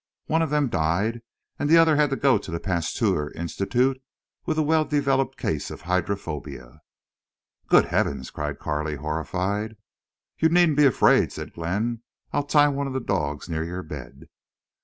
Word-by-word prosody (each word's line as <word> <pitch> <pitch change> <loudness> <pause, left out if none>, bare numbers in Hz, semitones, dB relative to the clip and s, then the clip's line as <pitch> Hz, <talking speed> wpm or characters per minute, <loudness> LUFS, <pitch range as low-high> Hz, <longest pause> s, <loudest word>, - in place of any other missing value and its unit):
One 160 +1 +1
of 160 - 0
them 150 -1 +2
died, 105 +4 0 0.4
and 145 - 0
the 165 - +7
other 165 -2 +5
had 150 -1 +3
to 135 - 0
go 135 -3 +3
to - - -10
the 85 - -3
Pasteur 85 -4 -1
Institute 125 +10 0 0.5
with - - 0
a 155 - +3
well 155 +1 +3
developed 135 -3 0
case 75 -2 -2
of - - -9
hydrophobia." 80 -6 -4 0.9
"Good - - +5
heavens!" 65 -3 -1
cried 75 -1 -4
Carley, 75 0 -2
horrified. 90 +9 -3 0.6
"You 160 - +4
needn't 170 -3 +4
be 150 -1 +7
afraid," 125 - +4
said - - -8
Glenn. 105 +8 -2 0.3
"I'll - - +2
tie 145 0 +5
one 140 0 -2
of 135 - -5
the 130 - -1
dogs 75 - -2
near 80 -2 -2
your 90 +2 -5
bed." - - -10
105 Hz, 165 wpm, -24 LUFS, -, 0.9 s, the